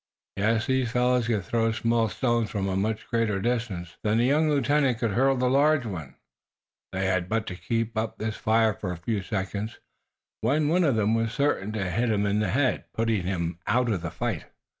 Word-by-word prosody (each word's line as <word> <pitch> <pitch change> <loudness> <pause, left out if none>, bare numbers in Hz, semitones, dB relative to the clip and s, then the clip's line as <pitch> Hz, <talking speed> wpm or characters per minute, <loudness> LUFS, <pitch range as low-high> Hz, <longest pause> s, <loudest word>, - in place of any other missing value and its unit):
Yes! 110 +3 +1
These 130 -2 +1
fellows 125 0 +2
could 110 -5 0
throw 115 +4 +1
small 115 0 +1
stones 120 +1 0
from 100 -2 -2
a 95 - -1
much 105 +3 -1
greater 115 -4 0
distance 110 -7 -2
than 105 +1 +1
the 120 - +3
young 150 +4 +3
lieutenant 140 -3 +2
could 115 -2 -1
hurl 135 +5 +3
the 125 0 +1
large 140 +1 +3
one. 85 -10 -6 0.8
They 95 +1 -1
had 95 -1 0
but 115 0 0
to 95 - -5
keep 115 +3 -2
up 110 0 -2
this 110 0 -3
fire 110 0 +2
for 95 -2 -5
a 90 - -5
few 100 +4 -2
seconds 100 +3 -4 0.6
when 150 +2 +2
one 175 +2 +3
of 140 -6 +2
them 110 0 +2
was 115 -1 0
certain 125 -8 0
to 100 -3 -2
hit 115 +7 0
him 105 -2 +1
in 100 +1 +1
the 105 -3 0
head, 130 +6 +1
putting 115 -3 +1
him 85 -2 -2
out 125 0 +2
of 95 -5 -1
the 85 - -3
fight. - - -3
115 Hz, 205 wpm, -26 LUFS, 100-125 Hz, 0.8 s, the